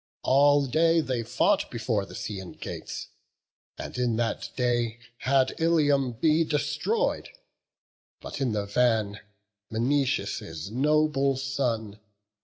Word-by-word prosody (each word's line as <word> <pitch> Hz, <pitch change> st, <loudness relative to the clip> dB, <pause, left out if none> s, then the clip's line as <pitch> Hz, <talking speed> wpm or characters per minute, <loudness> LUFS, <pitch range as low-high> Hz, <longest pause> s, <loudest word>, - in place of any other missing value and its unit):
All 145 Hz, +1 st, +4 dB
day 165 Hz, +4 st, +3 dB
they 130 Hz, -6 st, -1 dB
fought 120 Hz, +3 st, +1 dB
before 110 Hz, -4 st, -2 dB
the -, -, -11 dB
Scaean* 100 Hz, -3 st, -6 dB
gates; -, -, -6 dB, 0.7 s
And -, -, -7 dB
in 120 Hz, -2 st, +1 dB
that 115 Hz, 0 st, -2 dB
day 120 Hz, -2 st, 0 dB, 0.2 s
had 130 Hz, +1 st, +2 dB
Ilium 145 Hz, -6 st, +2 dB
been 155 Hz, +6 st, +2 dB
destroy'd, 150 Hz, -, -1 dB, 0.9 s
But -, -, -7 dB
in 130 Hz, -3 st, +1 dB
the 105 Hz, -1 st, -1 dB
van, 110 Hz, -1 st, +1 dB, 0.5 s
Menoetius' 115 Hz, -, -1 dB
noble 140 Hz, +1 st, +2 dB
son. 120 Hz, -6 st, -2 dB
130 Hz, 110 wpm, -27 LUFS, 110-145 Hz, 0.9 s, All